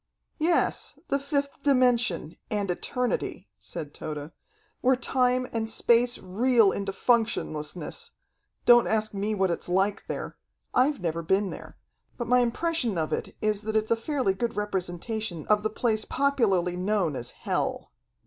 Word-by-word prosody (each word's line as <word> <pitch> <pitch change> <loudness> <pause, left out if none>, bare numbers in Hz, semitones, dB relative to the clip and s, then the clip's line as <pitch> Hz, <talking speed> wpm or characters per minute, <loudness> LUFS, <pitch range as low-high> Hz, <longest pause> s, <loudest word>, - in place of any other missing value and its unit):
"Yes, 330 +2 +1
the 280 - +2
fifth 280 0 -2
dimension, 245 - +2
and 205 -3 -1
eternity," 250 +7 -2
said 145 -2 -7
Tode, 150 0 -6 0.5
"where 260 +1 +4
time 255 0 +1
and 225 -1 -1
space 240 +2 +3
reel 225 +2 +3
into 195 -1 -2
functionlessness. 220 - -1 0.6
Don't 240 -1 +7
ask 215 -1 0
me 205 +2 -1
what 190 -2 +2
it's 170 - -4
like 195 +3 +1
there. - - -5 0.4
I've 270 -2 +3
never 170 -1 -1
been 190 +4 +1
there. - - -10 0.4
But 240 - -3
my 250 +1 +5
impression 245 - 0
of 155 -1 -1
it - - -3
is 210 -1 +1
that 220 0 -4
it's 220 0 +1
a - - +6
fairly 250 -3 0
good 235 +5 -2
representation 190 -2 -3
of 210 -1 +3
the 215 - 0
place 220 0 0
popularly 210 -11 +1
known 180 -4 0
as 120 -1 -5
hell. - - -3
215 Hz, 150 wpm, -27 LUFS, 190-250 Hz, 0.6 s, Don't